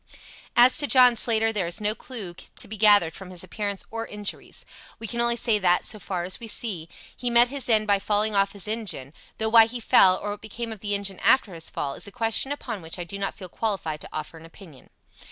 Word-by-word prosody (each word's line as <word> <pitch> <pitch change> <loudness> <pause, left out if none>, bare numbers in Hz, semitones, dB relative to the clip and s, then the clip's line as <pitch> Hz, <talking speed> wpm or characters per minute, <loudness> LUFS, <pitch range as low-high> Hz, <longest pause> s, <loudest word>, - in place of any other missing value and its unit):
"As 245 +1 +6
to 290 - +1
John 250 -3 +6
Slater, 225 -1 +2
there 195 -5 -1
is 170 - -2
no 210 0 0
clue 220 -7 -8
to 175 - -6
be 220 - -6
gathered 205 -6 +5
from 190 -2 -10
his 180 -1 -5
appearance 200 +1 -4
or 225 0 -5
injuries. 210 -1 -6 0.3
We 225 - -8
can 235 +2 -2
only 235 0 +2
say 230 -3 +2
that, 180 -2 +2
so 215 - -5
far 180 -2 -4
as 180 +1 -3
we 230 - -7
can - - +1
see, 175 -8 -4 0.3
he 245 - -2
met 240 +1 +5
his 275 -2 -2
end 215 -2 +3
by 200 -1 +2
falling 210 +2 0
off 195 0 +2
his 200 0 -3
engine, 210 - -3 0.2
though 220 0 -1
why 225 0 +7
he 245 +1 -6
fell, 185 -4 +5
or 205 - -5
what 205 - -8
became 225 +2 -6
of 220 - -8
the 205 0 -2
engine 200 -2 -2
after 220 -7 +3
his 165 -1 -4
fall, 140 -1 -4
is - - -6
a - - -10
question 225 +5 -1
upon 235 -8 -5
which 165 +2 -5
I 175 - -5
do 200 +4 -8
not 195 - -3
feel 190 -4 -9
qualified 175 -6 -3
to - - -8
offer 155 +1 -7
an 160 - -14
opinion." 165 -5 -16
210 Hz, 245 wpm, -24 LUFS, 185-230 Hz, 0.3 s, why